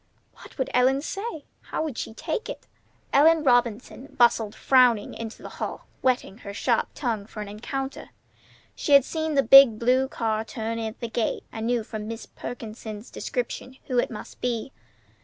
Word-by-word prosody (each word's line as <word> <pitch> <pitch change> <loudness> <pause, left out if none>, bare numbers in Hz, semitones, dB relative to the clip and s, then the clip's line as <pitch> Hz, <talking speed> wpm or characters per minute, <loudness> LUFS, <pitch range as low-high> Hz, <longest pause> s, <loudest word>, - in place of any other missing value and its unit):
What - - -15
would 265 - -2
Ellen 265 +3 +3
say? 390 -4 -5 0.2
How - - -1
would 305 -6 -4
she 220 - -5
take 445 - -3
it? - - -7 0.5
Ellen 315 +2 +6
Robinson 245 0 +1
bustled 230 -3 +3
frowning 250 -5 +4
into 225 -1 -7
the - - -7
hall, - - -4 0.2
whetting 245 -5 0
her 200 -3 -8
sharp - - +1
tongue 225 -6 -2
for 220 - -10
an - - -9
encounter. 265 +6 -5 0.6
She 290 - 0
had 280 -2 +8
seen 315 -2 -2
the 275 - +4
big 265 -2 +9
blue 255 +3 +2
car 220 -4 -1
turn 225 0 -4
in 225 - -2
at 220 - -8
the 235 - -2
gate, 225 0 -1
and 225 0 -4
knew 240 -2 +1
from 215 0 -6
Mrs. 230 0 -7
Perkins's 220 -2 -7
description 265 - -4
who 250 -2 +1
it - - +1
must 215 - -9
be. 235 -3 -2
240 Hz, 175 wpm, -25 LUFS, 220-270 Hz, 0.6 s, big